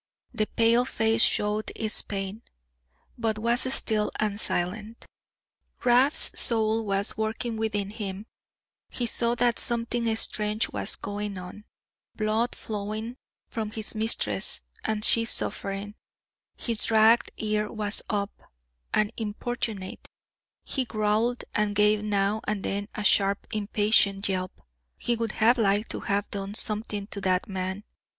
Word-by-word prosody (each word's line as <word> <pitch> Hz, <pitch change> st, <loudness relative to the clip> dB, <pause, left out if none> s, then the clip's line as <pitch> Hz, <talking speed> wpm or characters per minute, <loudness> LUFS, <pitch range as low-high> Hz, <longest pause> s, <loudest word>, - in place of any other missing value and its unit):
The 215 Hz, -, 0 dB
pale 230 Hz, +1 st, +3 dB
face 225 Hz, -2 st, +1 dB
showed 210 Hz, 0 st, +2 dB
its 220 Hz, -1 st, 0 dB
pain, 195 Hz, +2 st, -5 dB, 0.8 s
but 225 Hz, -2 st, 0 dB
was 235 Hz, +4 st, +1 dB
still 215 Hz, -5 st, +2 dB
and 210 Hz, -1 st, -1 dB
silent. 210 Hz, +5 st, -2 dB, 0.8 s
Rab's 250 Hz, +4 st, +6 dB
soul 225 Hz, -1 st, +4 dB
was 200 Hz, +2 st, 0 dB
working 220 Hz, +2 st, -2 dB
within 210 Hz, -2 st, -2 dB
him; 205 Hz, -2 st, -6 dB, 0.6 s
he 245 Hz, -, -2 dB
saw 235 Hz, +1 st, 0 dB
that 240 Hz, 0 st, +1 dB
something 235 Hz, -1 st, +1 dB
strange 215 Hz, 0 st, 0 dB
was -, -, 0 dB
going 205 Hz, -1 st, -5 dB
on 180 Hz, +4 st, -9 dB, 0.5 s
blood 220 Hz, +2 st, 0 dB
flowing 215 Hz, +3 st, -5 dB, 0.3 s
from 220 Hz, -2 st, -4 dB
his 215 Hz, -1 st, -4 dB
mistress, 215 Hz, -, 0 dB, 0.2 s
and 215 Hz, -1 st, -1 dB
she 230 Hz, -, +5 dB
suffering; 200 Hz, -2 st, -3 dB, 0.6 s
his 230 Hz, -3 st, -2 dB
ragged 225 Hz, +1 st, +5 dB
ear 210 Hz, -1 st, -1 dB
was 210 Hz, -1 st, +2 dB
up, 205 Hz, -2 st, -1 dB, 0.6 s
and 215 Hz, +1 st, +1 dB
importunate; 215 Hz, -2 st, -4 dB, 0.6 s
he 265 Hz, -, 0 dB
growled 220 Hz, +1 st, 0 dB
and 210 Hz, -1 st, 0 dB
gave 210 Hz, 0 st, +4 dB
now 205 Hz, 0 st, 0 dB
and 210 Hz, -2 st, -2 dB
then 200 Hz, +1 st, -2 dB
a 210 Hz, -, -3 dB
sharp 200 Hz, -1 st, +3 dB
impatient 205 Hz, -1 st, +2 dB
yelp; 185 Hz, -1 st, -3 dB, 0.4 s
he 240 Hz, -, 0 dB
would 230 Hz, -1 st, -3 dB
have 235 Hz, +3 st, +3 dB
liked 205 Hz, 0 st, +2 dB
to -, -, -3 dB
have 200 Hz, 0 st, -1 dB
done 200 Hz, 0 st, -4 dB
something 210 Hz, -2 st, -3 dB
to 200 Hz, -1 st, -5 dB
that 185 Hz, -1 st, +1 dB
man. 190 Hz, +1 st, -4 dB
215 Hz, 130 wpm, -27 LUFS, 205-225 Hz, 0.8 s, Rab's